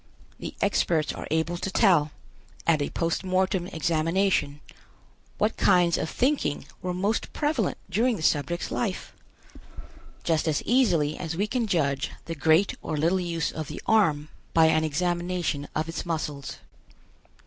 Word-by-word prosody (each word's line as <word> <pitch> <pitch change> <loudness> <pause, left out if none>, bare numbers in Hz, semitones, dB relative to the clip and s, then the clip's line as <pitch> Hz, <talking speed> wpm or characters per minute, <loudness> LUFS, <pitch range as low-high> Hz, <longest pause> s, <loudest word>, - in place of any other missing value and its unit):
The - - -6
experts 160 -3 +1
are - - -7
able 160 +2 0
to 195 - -3
tell, 180 -7 +4 0.6
at 160 -3 +3
a 145 - -1
post 165 +2 -1
mortem 185 -1 0
examination, 165 -1 0 0.8
what - - 0
kinds 175 -2 +4
of 160 - -2
thinking 260 - 0 0.2
were 180 - -2
most 200 +5 -1
prevalent 290 - 0
during 225 +6 +1
the 160 - -6
subject's 165 +3 0
life, 205 -6 -3 1.1
just 165 -1 +1
as 155 -2 0
easily 175 - +2
as 160 -2 -4
we 200 - +1
can 235 +1 -1
judge 140 -7 0 0.2
the 165 - -4
great 160 +5 +3
or 155 - -3
little 170 +5 +2
use 170 -3 -2
of 155 -2 -5
the - - -6
arm 155 -9 +2 0.3
by 165 -1 +7
an 155 0 +3
examination 175 -1 -1
of 155 +1 -1
its 165 - -4
muscles. 150 -5 -4
170 Hz, 150 wpm, -26 LUFS, 155-190 Hz, 1.1 s, by